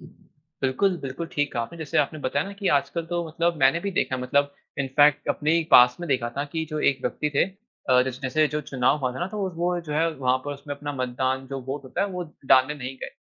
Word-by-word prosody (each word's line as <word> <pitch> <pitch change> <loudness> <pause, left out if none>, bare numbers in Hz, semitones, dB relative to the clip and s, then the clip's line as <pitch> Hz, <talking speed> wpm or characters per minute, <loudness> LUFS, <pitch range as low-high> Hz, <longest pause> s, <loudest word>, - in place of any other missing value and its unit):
बिल्कुल, 155 +4 -3
बिल्कुल 135 +5 -4
ठीक 145 -1 0
कहा 120 - -1
आपने। 170 +8 -8
जैसे 155 -3 -1
आपने 150 +1 0
बताया 140 +3 0
ना 200 - -7
कि 200 -1 -2
आजकल 165 +4 -2
तो 175 0 -2
मतलब 170 +1 0
मैंने 135 +5 +4
भी 200 - -2
देखा 150 -7 0
है 125 - -5
मतलब 140 +3 +1 0.3
इनफ़ेेक्ट 145 +2 +3
अपने 150 +2 +1
ही 170 - +3
पास 125 0 +8
में 175 - -4
देखा 125 -3 +1
था 140 - 0
की 160 -1 -1
जो 155 - -2
एक 135 - -6
व्यक्ति 150 - -1
थे - - +4 0.5
अ, 125 0 +6
जैस 130 0 -5
जैसे 155 +4 +2
जो 150 +1 -2
चुनाव 135 0 +1
हुआ 130 -3 -1
था - - -6
ना 175 - 0
तो 210 - -6
वो 195 -2 0
वो 175 +1 0
जो 150 - -4
है 160 +2 +2
वहाँ 130 -1 +2
पर 145 - -3
उसमे 145 +1 -7
अपना 145 +1 -5
मतदान 130 0 -2
जो 135 0 -5
वोट 140 +1 -4
होता 130 - -4
है 200 - +1
वो 180 -2 -4 0.2
डालने 130 +3 +5
नहीं 135 -2 -6
गए। - - -6
145 Hz, 255 wpm, -25 LUFS, 130-165 Hz, 0.5 s, पास